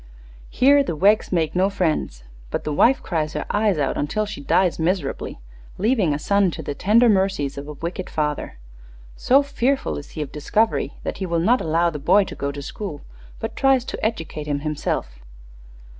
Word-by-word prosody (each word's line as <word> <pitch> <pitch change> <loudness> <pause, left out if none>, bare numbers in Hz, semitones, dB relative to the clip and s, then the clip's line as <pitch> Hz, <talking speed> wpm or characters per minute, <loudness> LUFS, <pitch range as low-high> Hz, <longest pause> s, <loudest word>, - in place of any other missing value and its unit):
Here 280 +3 +5
the 210 - -3
Weggs 205 +6 +3
make 165 -3 0
no 190 +2 +3
friends: 160 - -1 0.3
but - - -3
the 150 - -2
wife 260 - +3
cries 155 -3 -2
her - - -3
eyes 205 -4 +2
out 140 -2 0
until 215 +9 -1
she 210 -8 -7
dies 175 +5 +2
miserably, 175 - -2 0.4
leaving 210 - +2
a 145 - 0
son 200 +4 +2
to 160 - -6
the 145 - -3
tender 215 +10 +4
mercies 190 -9 +1
of 140 +1 -7
a 150 - -6
wicked 170 +5 -5
father. 150 - -2 0.6
So 275 +3 +4
fearful 275 -1 -1
is 145 - -12
he 155 - -1
of 140 - -10
discovery 210 +9 0
that - - -4
he 190 - -2
will 170 -1 0
not 235 +10 +3
allow 165 +2 +1
the 150 - -6
boy 200 +8 +4
to - - -8
go 140 0 -3
to 140 0 -7
school, 165 -2 -6 0.4
but - - -5
tries 270 -2 +3
to - - -6
educate 165 -8 -3
him 145 -1 -1
himself." 145 - -3
175 Hz, 190 wpm, -22 LUFS, 150-215 Hz, 0.6 s, Here